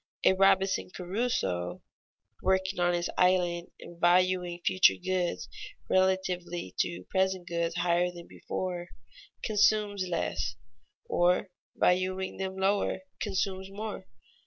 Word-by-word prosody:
A - - +6
Robinson 195 0 +3
Crusoe 180 - -2 0.6
working 190 0 +1
on 175 0 +3
his 175 0 -1
island 180 -1 +2
and 170 0 -12
valuing 180 0 +3
future 185 - +5
goods 180 - -2 0.4
relatively 185 - 0
to 90 +1 -1
present 190 -2 +1
goods 170 0 -1
higher 175 0 +2
than 175 -1 -10
before, 180 -2 -5 0.6
consumes 210 -2 +2
less; 70 - -2 0.5
or, 180 +2 +2 0.2
valuing 185 +1 +1
them 190 0 -4
lower, 195 0 +1 0.2
consumes 190 -1 -2
more. 205 -1 -6
185 Hz, 110 wpm, -29 LUFS, 175-190 Hz, 0.6 s, A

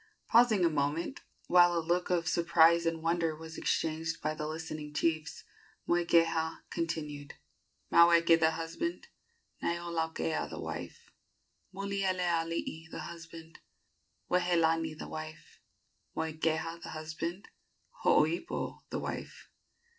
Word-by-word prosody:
Pausing 225 -6 +5
a - - +4
moment, 150 - -1 0.3
while 175 -1 +5
a - - +3
look 175 +2 0
of 175 -2 +1
surprise 170 0 +4
and 165 -1 -2
wonder 165 -1 +1
was 160 +1 -9
exchanged 160 +1 -1
by 155 +1 -1
the 155 0 -4
listening 155 -1 -6
chiefs, 155 -1 -1 0.4
Moikeha 165 -2 +2
continued: 150 -4 -4 0.6
"Maweke 170 -1 +6
the 160 0 +4
husband, 165 - -4 0.5
"Naiolaukea 165 - -2
the - - -7
wife; - - -7 0.6
"Mulielealii 180 -5 -1
the - - -6
husband, 165 -1 -10 0.7
"Wehelani 165 -3 +2
the - - -7
wife; 155 0 -8 0.6
"Moikeha 160 +1 -1
the - - -8
husband, 160 +5 -5 0.5
"Hooipo 160 +3 +1
the - - -3
wife." - - -6
165 Hz, 110 wpm, -31 LUFS, 160-170 Hz, 0.7 s, Maweke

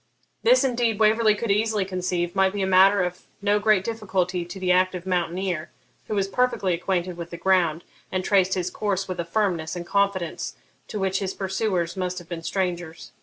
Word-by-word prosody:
This - - +5
indeed 240 -4 +1
Waverley 215 0 +4
could 220 0 -2
easily 210 -1 +1
conceive 180 -2 -2
might 190 0 +3
be 200 -1 -1
a - - +2
matter 190 +1 +5
of 180 +1 -4 0.2
no 205 +1 +2
great 210 -2 +3
difficulty 190 -5 -1
to 175 +3 -9
the 185 -1 +1
active 185 0 +2
mountaineer, 180 -2 -1 0.4
who 215 - -2
was 195 -1 +1
perfectly 200 -3 +1
acquainted 180 0 -2
with 170 -1 -6
the 170 - -7
ground, 175 -3 +2 0.3
and 185 -1 -2
traced 190 -2 +3
his 180 -1 -2
course 195 -2 -1
with 185 -1 -5
a 170 - -1
firmness 170 -4 -1
and 175 -1 -5
confidence 195 -2 -1 0.3
to - - -5
which 190 -1 0
his 195 -2 -3
pursuers 190 -3 -1
must 185 -1 -3
have 175 - -8
been 170 -1 -5
strangers. 175 -2 -3
190 Hz, 190 wpm, -24 LUFS, 175-200 Hz, 0.4 s, This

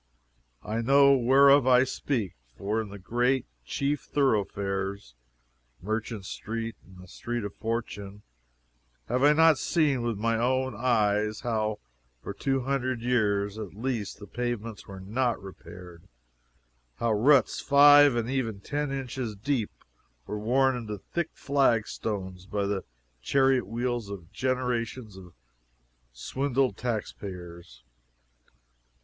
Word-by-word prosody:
I 110 +2 -2
know 140 +3 +6
whereof 135 +2 +5
I 125 0 +6
speak 125 - -2 0.2
for 105 +3 -1
in 110 - -7
the 100 - -9
great, 120 +6 0 0.2
chief 140 - -1
thoroughfares 100 - -1 0.7
(Merchant 110 0 -4
street 115 +2 -5
and 95 -1 -17
the 90 0 -13
Street 120 +5 -4
of 100 -1 -5
Fortune) 105 -3 -5 0.9
have 125 +2 0
I 145 +2 +6
not 160 -2 +5
seen 150 -7 +1
with 120 -3 -2
my 115 +2 0
own 130 +2 +1
eyes 105 -3 +1
how 110 -3 -1 0.5
for - - -5
two 135 -1 -1
hundred 130 -2 -2
years 105 -4 +1
at 100 -3 -7
least 115 -2 -3
the 105 - -10
pavements 115 -2 -4
were 95 -1 -9
not 115 +5 -1
repaired! 90 -3 -12 0.9
how 115 - 0
ruts 130 +4 +4
five 145 -1 +7
and 115 -1 -1
even 120 -6 -2
ten 145 +6 -3
inches 130 -4 -4
deep 115 +1 -1 0.6
were 105 - -4
worn 130 +4 +2
into 115 -3 -5
the 105 - -6
thick 170 -2 -1
flagstones 105 -8 -1
by 100 -1 -1
the 100 -1 -2 0.4
chariot 130 - +2
wheels 120 -1 -2
of 95 -3 -9
generations 125 -3 -2
of 90 -2 -13 0.8
swindled 130 - -1
tax 115 -1 -3
payers? 85 -9 -10
115 Hz, 130 wpm, -27 LUFS, 100-130 Hz, 0.9 s, five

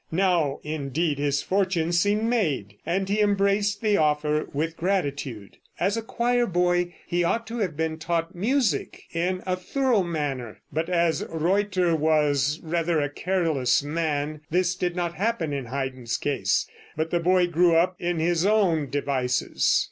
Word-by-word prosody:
Now 170 -5 +2
indeed 150 0 -2
his 145 -1 0
fortune 185 -4 0
seemed 205 +5 +2
made, 170 - 0
and 190 +2 0
he 205 +2 0
embraced 200 0 +2
the 210 -2 +3
offer 150 0 +1
with 160 +3 -2
gratitude. 140 - -2 0.2
As 195 +4 +1
a 230 - -1
choir 240 +2 0
boy 175 -1 +1
he 175 0 0
ought 230 +7 0
to 235 +1 -5
have 180 -8 -2
been 160 0 -2
taught 165 0 -2
music 210 - 0
in 180 +2 -1
a 185 -1 0
thorough 245 +4 +1
manner, 145 - -3
but 160 +4 -1
as 170 -2 +1
Reutter 180 +1 +1
was 150 -2 +2
rather 165 0 0
a 145 -1 -1
careless 160 -7 +1
man 150 -1 -2
this 180 +1 +2
did 180 -1 -2
not 175 -1 -1
happen 180 -4 -1
in 135 -3 -3
Haydn's 130 -2 -3
case, 145 -2 0 0.3
but 160 +1 -1
the 175 - +2
boy 180 +1 +3
grew 175 0 +3
up 180 +3 +3
in 175 0 -1
his 170 +1 +1
own 185 -8 +2
devices. 130 -3 +1
170 Hz, 155 wpm, -25 LUFS, 150-185 Hz, 0.3 s, the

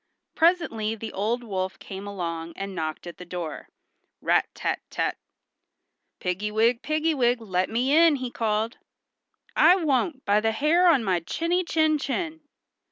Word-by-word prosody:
Presently 320 -11 +2
the 225 0 -7
old 225 +5 -1
wolf 190 -4 -3
came 195 0 -8
along 170 -4 -4
and 195 0 -5
knocked 155 -2 -4
at 175 - -9
the - - -7
door—rat 175 -3 -3
tat - - -1
tat! - - -1 1.0
"Piggy 185 +4 -2
wig, 230 +3 +2
piggy 310 +1 0
wig, 245 -3 +2
let 185 -4 -1
me 250 +6 +1
in," 330 -1 +6
he 255 -3 -4
called. 220 0 -1 0.8
"I 340 +3 +7
won't, 285 -4 0
by 205 +1 +4
the 225 +1 0
hair 320 +9 +3
on 275 -8 +4
my 185 -4 +1
chinny 335 - -1
chin 315 -2 +2
chin." 320 +4 -3
225 Hz, 150 wpm, -25 LUFS, 195-310 Hz, 1.0 s, I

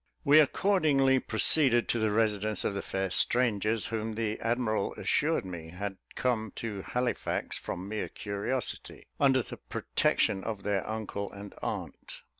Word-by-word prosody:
We 150 +1 +7
accordingly 145 -5 +3
proceeded 120 +1 +3
to 120 - +1
the 110 0 +2
residence 105 -1 +1
of - - 0
the 100 - -3
fair 95 -1 -2
strangers, 110 -2 +2
whom 110 -1 -3
the 110 -1 -2
admiral 115 -3 0
assured - - +1
me 85 -3 -7
had 95 +3 -5 0.2
come 110 -5 -1
to 105 -4 -4
Halifax 125 +4 -2
from 90 +2 -5
mere 105 +1 -3
curiosity, 105 +5 -4
under 135 -3 +4
the - - -9
protection 95 - +1
of 105 -4 -4
their 100 -1 -1
uncle 105 -2 -4
and 100 0 -9
aunt. - - -5
110 Hz, 145 wpm, -30 LUFS, 100-125 Hz, 0.2 s, We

